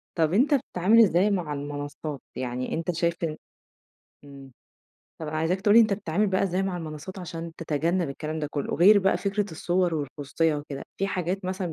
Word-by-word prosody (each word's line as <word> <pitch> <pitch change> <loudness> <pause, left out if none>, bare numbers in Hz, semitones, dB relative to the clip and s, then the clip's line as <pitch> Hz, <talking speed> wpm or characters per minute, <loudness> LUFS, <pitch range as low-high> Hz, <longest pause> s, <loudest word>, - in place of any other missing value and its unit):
طب 160 -1 +2
أنت 265 +9 +4
بتتعامل 225 -4 +3
إزاي 190 +1 +3
مع 170 -6 -1
المنصات، 145 0 -5
يعني 125 0 -3
أنت 165 +2 -1
شايف 170 0 +1
إن 155 -1 -2 0.9
إمم 135 -2 -12 0.7
طب 160 - -4
أنا 155 - -3
عايزاك 165 +4 0
تقول 205 +1 +4
لي - - +10
أنت 215 -3 +3
بتتعامل 200 +1 0
بقى 190 0 +1
إزاي 190 0 0
مع 190 -2 -2
المنصات 160 +3 -7
عشان 165 -1 -6
تتجنب 165 +2 0
الكلام 155 +3 -4
ده 150 - -2
كله، 145 -2 -2
غير 200 +5 +7
بقى 195 0 +2
فكرة 200 0 -1
الصور 175 +1 0
والخصوصية 150 +2 -1
وكده، 145 -1 -6
في 195 - 0
حاجات 185 0 -2
مثلًا 185 -2 -3
170 Hz, 185 wpm, -26 LUFS, 150-190 Hz, 0.9 s, لي